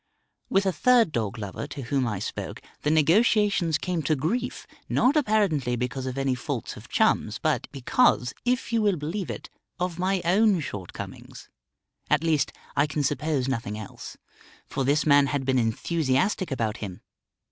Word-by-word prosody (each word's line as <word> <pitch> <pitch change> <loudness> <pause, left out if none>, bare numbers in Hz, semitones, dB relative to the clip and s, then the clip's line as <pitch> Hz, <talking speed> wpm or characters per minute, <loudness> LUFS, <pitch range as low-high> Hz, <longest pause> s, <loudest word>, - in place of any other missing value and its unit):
With 195 +1 +2
a 190 - +3
third 235 +1 +4
dog 110 -3 -2
lover 105 +6 -5
to 145 -2 -7
whom 130 +1 0
I 105 -4 -2
spoke 95 - -5 0.2
the 150 - 0
negotiations 175 +1 +3
came 175 +1 -2
to 155 +2 +1
grief, 210 - -2 0.2
not 260 +4 +3
apparently 200 - +2
because 125 +2 -3
of 130 +1 -4
any 135 -1 +1
faults 125 - -4
of - - -12
Chum's - - +2
but - - 0
because, 135 - +2
if 250 -1 0
you 230 - +3
will 205 -3 +3
believe 165 +5 -4
it, - - -7 0.3
of 180 -1 -2
my 185 0 0
own 200 +2 +4
shortcomings. 100 - -8 0.6
At - - +3
least, 155 -4 +2 0.2
I 145 +2 +3
can 145 0 -2
suppose 145 -1 0
nothing 115 -5 -2
else. 110 -2 -9 0.5
For 135 - -2
this 145 +4 +2
man 145 -2 +5
had 135 0 -2
been 130 -1 +2
enthusiastic 145 - 0
about 115 -5 -1
him. 95 -4 -7
150 Hz, 165 wpm, -26 LUFS, 130-190 Hz, 0.6 s, man